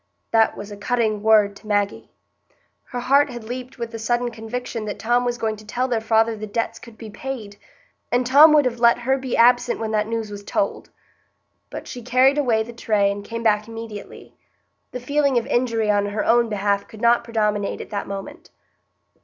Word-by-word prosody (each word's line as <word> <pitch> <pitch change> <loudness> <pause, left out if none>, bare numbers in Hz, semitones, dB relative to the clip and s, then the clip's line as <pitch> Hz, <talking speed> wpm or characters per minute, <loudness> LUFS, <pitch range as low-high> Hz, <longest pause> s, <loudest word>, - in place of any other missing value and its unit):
That 225 -1 +3
was 205 +1 -8
a 205 - -8
cutting 215 -1 0
word 210 -2 +4
to 215 - -16
Maggie. 205 -1 -1 0.8
Her 245 - -5
heart 280 +3 +3
had 240 -2 -8
leaped 250 +3 -7
with 235 -1 -5
the 225 - -7
sudden 240 +2 -1
conviction 230 0 -5
that 210 - -5
Tom 240 +2 +1
was 245 0 -1
going 220 -2 -2
to 215 - -13
tell 250 +4 -2
their 235 -3 -1
father 225 0 +2
the 215 0 -7
debts 225 +2 -3
could 235 -2 -14
be 220 -2 -9
paid; 220 -4 -7 0.5
and 245 +1 +2
Tom 290 +5 +7
would 295 -2 +5
have 245 -2 -2
let 235 0 +5
her 265 +3 0
be 260 -2 -3
absent 245 +1 +4
when 220 -1 -3
that 215 -1 0
news 225 -2 -3
was 205 0 -8
told! 200 0 -2 0.8
But - - -8
she 245 - -7
carried 255 +4 +3
away 230 -6 +2
the 235 +2 -10
tray 210 -3 +1
and 200 0 -6
came 230 +2 -6
back 210 -1 +2
immediately. 225 -2 -9 0.6
The 250 - -5
feeling 280 +1 +1
of 235 - 0
injury 230 -3 +1
on 205 0 +1
her 210 +1 -2
own 235 0 +3
behalf 200 -1 -1
could 220 - -13
not 235 0 +4
predominate 210 -3 -1
at - - -9
that 205 -1 -3
moment. 200 - -8
230 Hz, 205 wpm, -22 LUFS, 210-245 Hz, 0.8 s, Tom